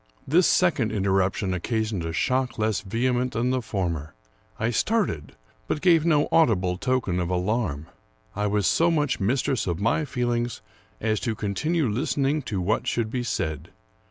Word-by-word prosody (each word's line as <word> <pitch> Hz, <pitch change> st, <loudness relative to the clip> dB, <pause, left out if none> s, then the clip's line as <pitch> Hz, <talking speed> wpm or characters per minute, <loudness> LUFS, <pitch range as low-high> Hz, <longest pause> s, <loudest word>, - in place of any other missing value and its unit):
This 170 Hz, +5 st, +4 dB
second 155 Hz, -, +2 dB
interruption 95 Hz, -1 st, +1 dB
occasioned 110 Hz, 0 st, -2 dB
a 80 Hz, -, -3 dB
shock 125 Hz, +8 st, 0 dB
less 110 Hz, -3 st, 0 dB
vehe 115 Hz, +6 st, 0 dB
ment 125 Hz, +1 st, -1 dB
than 120 Hz, +3 st, 0 dB
the 130 Hz, -1 st, 0 dB
former. 85 Hz, -9 st, -3 dB, 0.4 s
I 115 Hz, +2 st, 0 dB
started, 120 Hz, -, 0 dB, 0.3 s
but -, -, -1 dB
gave 165 Hz, -1 st, +4 dB
no 150 Hz, -3 st, +3 dB
audible 95 Hz, -, +3 dB
token 125 Hz, -8 st, 0 dB
of 85 Hz, -1 st, -1 dB
alarm. 90 Hz, -4 st, -1 dB, 0.5 s
I 105 Hz, +1 st, 0 dB
was 105 Hz, -1 st, +1 dB
so 170 Hz, -, +3 dB
much 150 Hz, -4 st, +1 dB
mistress 130 Hz, +4 st, 0 dB
of 85 Hz, -1 st, -1 dB
my 115 Hz, +9 st, +1 dB
feelings 120 Hz, -3 st, -2 dB, 0.4 s
as 110 Hz, -1 st, 0 dB
to 115 Hz, -3 st, -2 dB
continue 145 Hz, -, 0 dB
listening 140 Hz, +5 st, 0 dB
to 100 Hz, -3 st, -1 dB
what 100 Hz, +5 st, 0 dB
should 115 Hz, -2 st, -1 dB
be 125 Hz, -, -1 dB
said. 80 Hz, -, -3 dB
110 Hz, 160 wpm, -25 LUFS, 95-130 Hz, 0.5 s, This